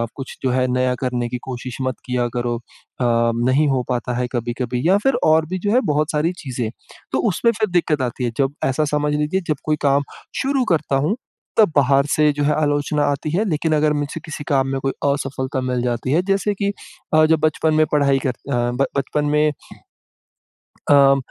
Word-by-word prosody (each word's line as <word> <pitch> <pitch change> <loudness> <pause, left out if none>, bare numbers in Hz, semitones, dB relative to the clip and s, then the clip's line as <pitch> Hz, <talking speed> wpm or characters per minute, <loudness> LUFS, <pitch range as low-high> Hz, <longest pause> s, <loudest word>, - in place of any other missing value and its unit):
कुछ 135 -1 -8
जो 130 - +2
है 130 0 +1
नया 125 0 +1
करने 125 -2 -1
की 125 - -3
कोशिश 125 -1 -6
मत 130 -1 -1
किया 125 -1 0
करो। 120 -1 -1
अ, 115 - -13 0.8
नहीं 135 +4 +3
हो 130 -2 +1
पाता 125 0 -1
है 125 0 -1
कभी-कभी 120 0 -2
या 190 - +5
फ़िर 270 - +3
और 160 0 +4
भी 185 0 -2
जो 205 +2 -1
है 250 - +5
बहुत 150 +2 +1
सारी 155 +2 +1
चीज़ें 125 -5 -3 0.4
तो - - 0
उसमें 230 +6 +2
फ़िर 215 -1 -1
दिक़्क़त 160 -5 +1
आती 125 0 -3
है 120 - 0
जब 135 0 +1
ऐसा 135 +4 +1
समझ 150 0 0
लीजिए 150 +6 0
जब 155 - 0
कोई 155 - +2
काम 140 0 +3 0.4
शुरू 270 -1 +1
करता 150 -3 0
हूँ 210 - +1 0.4
तब 210 -7 +5
बाहर 140 0 +4
से 150 -1 +4
जो 145 0 -2
है 150 - +2
आलोचना 145 0 +1
आती 145 +2 -3
है। 195 +6 +1
लेकिन 155 +1 0
अगर 150 0 +2
मुझसे 145 +2 -3
किसी 150 -2 -6
काम 135 -2 +2
में 135 - -1
कोई 135 - 0 0.2
असफ़लता 135 -1 -3
मिल 125 -1 -1
जाती 120 +1 -1
है 165 +5 +3
जैसे 200 +1 +1
कि 200 0 0 0.4
अ, 155 0 +6
जब 160 0 +3
बचपन 155 0 +1
में 155 0 +4
पढ़ाई 140 -2 +3
कर - - +2
अ, 125 - -2 0.2
ब 120 +2 +1
बचपन 145 +2 -1
में 150 +1 +2 1.4
अ, 140 -1 +6
145 Hz, 205 wpm, -20 LUFS, 130-155 Hz, 1.4 s, अ